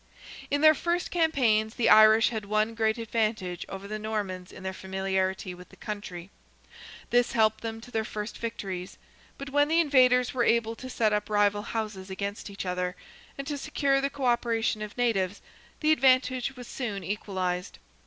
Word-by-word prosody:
In 285 0 0
their 310 0 +8
first 345 +4 -1
campaigns 245 -10 +2
the 240 - +1
Irish 215 +1 +7
had 220 -3 -4
one 215 +2 +1
great 220 0 +1
advantage 215 -6 -2
over 195 +1 -7
the 215 +1 -4
Normans 205 -4 -4
in 185 - -11
their 190 0 -3
familiarity 190 -1 -2
with 180 0 -13
the - - -16
country. 200 -3 -7 0.8
This 245 0 +3
helped 220 -1 +2
them 225 -1 -5
to 245 - -13
their 220 -2 0
first 210 0 -6
victories. 195 -6 -5 0.4
But 275 0 -7
when 290 +1 +3
the 325 +2 +3
invaders 255 -5 +4
were 250 -2 +1
able 230 -1 +2
to 255 - -8
set 220 -4 +1
up 210 0 -1
rival 205 -1 +2
houses 210 -4 -4
against 200 +2 -5
each 200 -1 -6
other, 180 0 -2 0.4
and 275 - -5
to 285 0 -4
secure 275 -2 +1
the 275 - 0
co 280 -1 -5
operation 235 -2 +1
of 210 +1 -7
natives, 205 -6 0 0.4
the 310 0 +3
advantage 255 -2 +3
was 245 -2 -10
soon 210 -7 -4
equalized. 185 -2 -3
220 Hz, 175 wpm, -28 LUFS, 195-250 Hz, 0.8 s, their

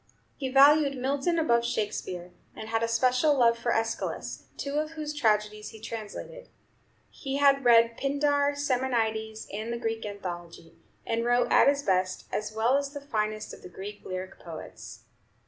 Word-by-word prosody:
He 265 -2 -3
valued 280 +1 +6
Milton 280 +6 0
above 235 -8 +3
Shakespeare, 190 -6 -3 0.2
and 220 - -8
had 225 0 0
a 230 - +1
special 255 +5 +3
love 235 -2 +5
for 235 +1 -2
Æschylus, 225 0 -2
two 285 +1 -2
of 310 +1 -3
whose 305 -1 -4
tragedies 215 -5 0
he 220 - -12
translated. 225 - -7 0.6
He 275 -1 -4
had 275 -1 +4
read 230 -1 +5
Pindar, 285 +1 +1
Simonides, 230 -5 -1
and 215 +3 -4
the 235 - -2
Greek 225 -1 -3
Anthology, 175 -5 -7 0.3
and 230 0 -1
wrote, 245 0 +2
at - - +6
his 285 0 +3
best, 185 -3 0
as 215 0 -2
well 225 +5 +2
as 280 0 -2
the 285 - -6
finest 215 -5 -3
of - - -12
the - - -10
Greek 200 +3 -8
lyric 185 0 -6
poets. 165 -2 -10
235 Hz, 165 wpm, -28 LUFS, 215-280 Hz, 0.6 s, valued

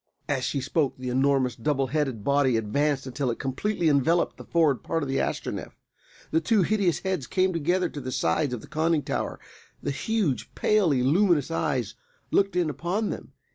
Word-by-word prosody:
As 135 -3 -1
she 140 - -1
spoke 135 +2 0
the 130 -1 -4
enormous, 130 -1 +2
double 135 +2 0
headed 135 -5 -1
body 140 -3 +3
advanced 140 +6 0
until 130 0 -2
it 115 - -2
completely 170 +7 -1
enveloped 155 +4 +2
the - - -10
forward 150 -9 +2
part 165 -1 -2
of - - -3
the 135 - 0
Astronef. - - -3 0.6
The 160 - +2
two 210 +2 +3
hideous 195 -3 +1
heads 185 -9 -2
came 185 0 +1
close 180 +2 +1
to 145 - -6
the 130 0 -5
sides 120 - +1
of 115 - -8
the - - -12
conning 160 0 +1
tower; - - -3 0.4
the 145 - -1
huge, 180 - -1
palely 170 -12 +2
luminous 165 +1 +3
eyes 135 -10 -1 0.4
looked 195 -1 +2
in 175 -2 +2
upon 180 +8 -2
them. - - -8
145 Hz, 180 wpm, -26 LUFS, 130-175 Hz, 0.6 s, body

